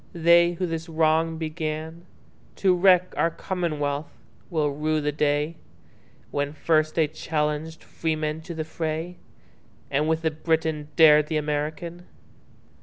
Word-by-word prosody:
They 170 Hz, 0 st, +5 dB
who 180 Hz, +2 st, -2 dB
this 165 Hz, 0 st, -4 dB
wrong 160 Hz, 0 st, +2 dB
beganTo 160 Hz, +4 st, -4 dB
wreck 180 Hz, 0 st, +4 dB
our 165 Hz, -, +2 dB
commonwealth, 150 Hz, -5 st, -3 dB, 0.4 s
will 155 Hz, -4 st, 0 dB
rue 155 Hz, +2 st, 0 dB
the 150 Hz, 0 st, -1 dB
dayWhen 145 Hz, -1 st, -4 dB
first 155 Hz, -1 st, +1 dB
they 160 Hz, -2 st, +3 dB
challenged 155 Hz, +1 st, -3 dB
freemen 155 Hz, -1 st, -2 dB
to 170 Hz, +1 st, -8 dB
the 160 Hz, -1 st, -3 dB
fray, 160 Hz, +2 st, -4 dB, 0.7 s
And 145 Hz, +3 st, +1 dB
with 160 Hz, 0 st, 0 dB
the 160 Hz, -, +1 dB
Briton 155 Hz, -1 st, -1 dB
dared 150 Hz, -2 st, +7 dB
the 155 Hz, -, -1 dB
American. 155 Hz, +4 st, -3 dB
160 Hz, 120 wpm, -25 LUFS, 150-165 Hz, 0.7 s, dared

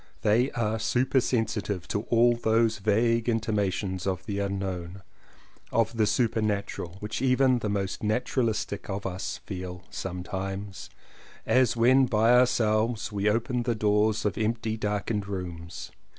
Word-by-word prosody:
They 120 Hz, +6 st, +3 dB
are 110 Hz, -2 st, -1 dB
supersensitive 115 Hz, -6 st, 0 dB
to 105 Hz, -, -1 dB
all 120 Hz, +1 st, +5 dB
those 115 Hz, -1 st, +2 dB
vague 115 Hz, +3 st, +2 dB
intimations 100 Hz, -4 st, -1 dB
of 95 Hz, -1 st, -2 dB
the 100 Hz, -3 st, -3 dB
unknown, 95 Hz, -2 st, -4 dB, 0.7 s
of 115 Hz, 0 st, +1 dB
the 110 Hz, -2 st, +2 dB
supernatural, 105 Hz, -5 st, -1 dB
which 105 Hz, -, -4 dB
even 130 Hz, -1 st, +3 dB
the 110 Hz, -, -2 dB
most 100 Hz, -2 st, -2 dB
naturalistic 110 Hz, -1 st, -1 dB
of 100 Hz, 0 st, -4 dB
us 95 Hz, 0 st, -3 dB
feel 90 Hz, -2 st, -6 dB
some 90 Hz, -1 st, -5 dB
times 95 Hz, +1 st, -5 dB, 0.3 s
— -, -, -22 dB, 0.2 s
as 130 Hz, -2 st, +3 dB
when 130 Hz, +3 st, +5 dB
by 115 Hz, +1 st, +3 dB
ourselves 115 Hz, -2 st, +2 dB
we 100 Hz, 0 st, +1 dB
open 120 Hz, +3 st, 0 dB
the 120 Hz, -1 st, -1 dB
doors 105 Hz, 0 st, +2 dB
of 105 Hz, -, -1 dB
empty 110 Hz, 0 st, -1 dB
darkened 105 Hz, -1 st, -2 dB
rooms. 85 Hz, -4 st, -6 dB
105 Hz, 135 wpm, -27 LUFS, 100-115 Hz, 0.7 s, all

